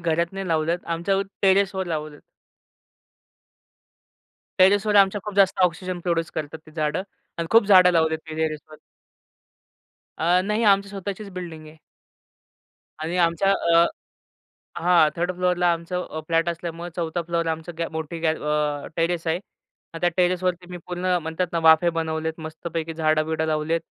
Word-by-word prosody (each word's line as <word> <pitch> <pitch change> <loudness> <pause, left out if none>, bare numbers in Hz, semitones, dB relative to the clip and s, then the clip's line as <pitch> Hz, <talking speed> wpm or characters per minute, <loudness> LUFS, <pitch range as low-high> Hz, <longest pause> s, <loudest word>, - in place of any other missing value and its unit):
घरात 170 +1 0
नाही 195 0 -5
लावलेत 165 +2 0
आमच्यावर 195 +4 0 0.2
टेरेसवर 190 -1 +2
लावले 155 -3 -4 2.4
टेरेसवर 205 +3 +4
आमच्या 200 +1 +4
खूप 210 - -6
जास्त 195 -1 +4
ऑक्सिजन 180 +1 0
प्रोड्यूस 165 -2 -1
करतात 155 0 -5
ती - - -14
झाडं. 155 +2 -1 0.4
आणि 170 - -2
खूप 225 -2 +5
झाडं 185 -3 +7
लावलेत 160 -1 +2
मी - - -5
टेरेसवर 155 -1 -3 1.4
अ, 175 +3 +3
नाही 210 +3 0
आमची 200 -1 +4
स्वतःचीच 200 +1 -6
बिल्डिंग 170 -4 -8
आहे. 155 +1 -14 1.3
आणि 165 +3 -2
आमच्या 170 +3 +3 0.2
अ 170 - +7 1.0
हां. 175 -3 +5
3rd 175 +2 -1
फ्लोरला 180 -1 +2
आमचं 170 +2 -3
अ, 155 - -5
फ्लॅट 165 0 +2
असल्यामुळं 170 0 -5
4 170 0 -2
फ्लोरला 170 0 -1
आमचं 160 +2 -7 0.2
मोठी 160 +1 -5
गॅ 160 -1 +2
अ, 150 -1 -2
टेरेस 165 0 -1
आहे. 160 +1 +1 0.6
हां, 165 - -8
त्या 175 - +2
टेरेसवरती 180 0 0
मी 180 - -6
पूर्ण 180 0 0
म्हणतात 160 +3 -2
ना 170 - 0
वाफे 160 +2 +6
बनवलेत 160 0 -3
मस्तपैकी 160 +1 -5
झाडं-बिडं 160 0 0
लावली 155 0 -1
आहेत. 165 - +2
170 Hz, 145 wpm, -23 LUFS, 160-180 Hz, 2.4 s, झाडं